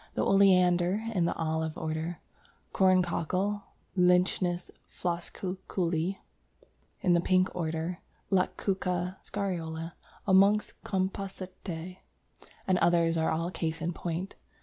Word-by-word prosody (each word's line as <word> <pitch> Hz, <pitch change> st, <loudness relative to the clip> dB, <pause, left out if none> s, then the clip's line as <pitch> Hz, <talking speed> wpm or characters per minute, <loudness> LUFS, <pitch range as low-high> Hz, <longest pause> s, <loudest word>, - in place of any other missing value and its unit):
The -, -, +1 dB
Oleander, 185 Hz, 0 st, +4 dB
in 180 Hz, -4 st, +2 dB
the 170 Hz, -, 0 dB
Olive 160 Hz, -1 st, -2 dB
order, 160 Hz, +2 st, -3 dB, 0.5 s
Corncockle 185 Hz, +2 st, +2 dB, 0.3 s
(Lychnis 180 Hz, -1 st, +2 dB, 0.2 s
floscuculli), 180 Hz, 0 st, -2 dB, 0.8 s
in 180 Hz, -, +3 dB
the 170 Hz, -, +4 dB
Pink 185 Hz, +1 st, +2 dB
order, 165 Hz, +1 st, -2 dB, 0.3 s
Lactuca 185 Hz, -1 st, 0 dB
Scariola 170 Hz, -5 st, -3 dB, 0.3 s
amongst 200 Hz, +2 st, +3 dB
Compositæ 185 Hz, -2 st, -4 dB, 0.7 s
and 185 Hz, -1 st, +2 dB
others 170 Hz, -1 st, +3 dB
are 160 Hz, -1 st, +1 dB
all 165 Hz, +2 st, -1 dB
cases 165 Hz, -2 st, -3 dB
in 175 Hz, +1 st, -1 dB
point. 175 Hz, +3 st, -4 dB
180 Hz, 100 wpm, -29 LUFS, 165-190 Hz, 0.8 s, Oleander